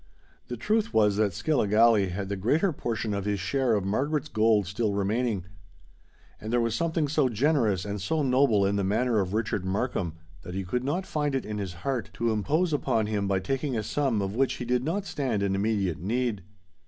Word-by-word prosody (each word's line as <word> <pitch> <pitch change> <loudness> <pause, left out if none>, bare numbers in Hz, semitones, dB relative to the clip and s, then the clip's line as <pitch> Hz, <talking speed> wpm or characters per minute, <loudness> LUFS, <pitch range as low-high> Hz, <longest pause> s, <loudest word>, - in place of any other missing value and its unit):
The 120 - -5
truth 215 - 0
was 105 -2 +4
that 105 -2 +2
Skilligalee 110 - +3
had 95 +2 -4
the 100 - -2
greater 150 - +1
portion 115 -5 -3
of 100 -1 -3
his 105 -1 -1
share 125 +4 +1
of 100 -2 -1
Margaret's 145 +8 -1
gold 110 -2 +3
still 100 +2 -1
remaining; 105 -1 0 0.9
and 110 - -6
there 120 - +3
was 115 -1 0
something 160 +1 0
so 145 -2 +2
generous 115 - +1
and 100 -1 -4
so 155 - 0
noble 125 -6 +3
in 100 +1 +1
the 100 - 0
manner 110 +4 +1
of 95 +1 -1
Richard 105 -3 -1
Markham, 95 -4 -2 0.3
that 90 - -8
he 95 - -2
could 125 +7 -2
not 170 +8 -1
find 150 -5 -1
it 135 - -2
in 105 -1 -4
his 95 -3 -4
heart 130 -4 -1
to 115 -1 0
impose 150 - +1
upon 125 -6 +1
him 105 -2 -1
by 95 -1 +1
taking 135 +5 -2
a 110 - -1
sum 125 -4 0
of 95 0 -3
which 130 +3 +1
he 125 - -5
did 125 +1 +1
not 185 +7 -2
stand 130 - -1
in 100 -1 +1
immediate 100 -5 0
need. 110 +3 -1
110 Hz, 205 wpm, -27 LUFS, 100-135 Hz, 0.9 s, was